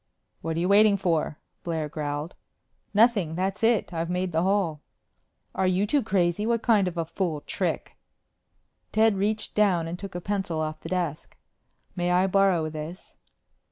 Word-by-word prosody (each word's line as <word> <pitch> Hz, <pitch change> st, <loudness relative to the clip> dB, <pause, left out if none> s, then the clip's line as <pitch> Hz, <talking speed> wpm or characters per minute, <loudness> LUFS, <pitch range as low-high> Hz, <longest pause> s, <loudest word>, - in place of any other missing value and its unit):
"What 165 Hz, 0 st, -3 dB
are -, -, +1 dB
you 175 Hz, -, +1 dB
waiting 205 Hz, +1 st, +5 dB
for?" 165 Hz, -5 st, 0 dB, 0.3 s
Blair 160 Hz, -3 st, -2 dB
growled. 150 Hz, +1 st, -4 dB, 0.6 s
"Nothing. 205 Hz, -7 st, +3 dB
That's 190 Hz, +4 st, -2 dB
it. 225 Hz, -4 st, +2 dB
I've 165 Hz, 0 st, -2 dB
made 180 Hz, 0 st, -1 dB
the 160 Hz, 0 st, +1 dB
hole." 185 Hz, -5 st, +1 dB, 0.7 s
"Are 190 Hz, -, +1 dB
you 185 Hz, +2 st, +2 dB
two 280 Hz, +7 st, +2 dB
crazy? 185 Hz, -3 st, +1 dB
What 230 Hz, 0 st, 0 dB
kind 210 Hz, -5 st, +4 dB
of 175 Hz, -1 st, -4 dB
a 165 Hz, -, 0 dB
fool 165 Hz, -2 st, -2 dB
trick -, -, -3 dB, 0.5 s
?" -, -, -47 dB
Ted 220 Hz, -1 st, +4 dB
reached 210 Hz, +2 st, -1 dB
down 185 Hz, -6 st, +2 dB
and 175 Hz, +2 st, -5 dB
took 195 Hz, -2 st, -8 dB
a -, -, -2 dB
pencil 190 Hz, -4 st, -2 dB
off 155 Hz, 0 st, -3 dB
the -, -, -7 dB
desk. 175 Hz, -5 st, -3 dB, 0.6 s
"May 175 Hz, -1 st, -1 dB
I 180 Hz, +1 st, +3 dB
borrow 190 Hz, -4 st, +3 dB
this?" 155 Hz, +3 st, -8 dB
180 Hz, 170 wpm, -26 LUFS, 165-200 Hz, 0.7 s, waiting